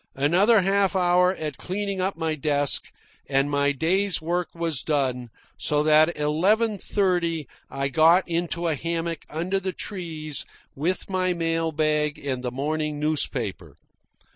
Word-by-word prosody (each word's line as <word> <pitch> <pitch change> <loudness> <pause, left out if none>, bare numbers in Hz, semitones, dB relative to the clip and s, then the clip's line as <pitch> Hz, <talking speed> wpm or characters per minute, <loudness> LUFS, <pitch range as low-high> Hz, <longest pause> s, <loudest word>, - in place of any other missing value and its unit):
Another 185 - +4
half 195 +1 +2
hour 180 0 +3
at 155 -3 -5
cleaning 195 0 -3
up 190 -1 -1
my 160 -1 -1
desk, 145 -1 -1 0.4
and 135 +1 +1
my 145 0 +2
day's 180 +6 +1
work 175 +2 -2
was 165 -6 -1
done, 130 -5 -1 0.3
so 150 0 +1
that 155 +1 +5
at 170 - -7
eleven 195 +9 +2
thirty 175 - 0 0.2
I 135 0 -2
got 165 +7 +5
into 170 0 -1
a 160 - +1
hammock 165 +2 -3
under 175 +5 -1
the 190 -1 -3
trees 160 -8 -5 0.3
with 170 +7 -2
my 185 -2 0
mail 165 -1 0
bag 150 -1 0
and 130 -3 -4
the 125 - -1
morning 150 +3 -2
newspaper. 145 - -2
165 Hz, 145 wpm, -25 LUFS, 150-180 Hz, 0.4 s, that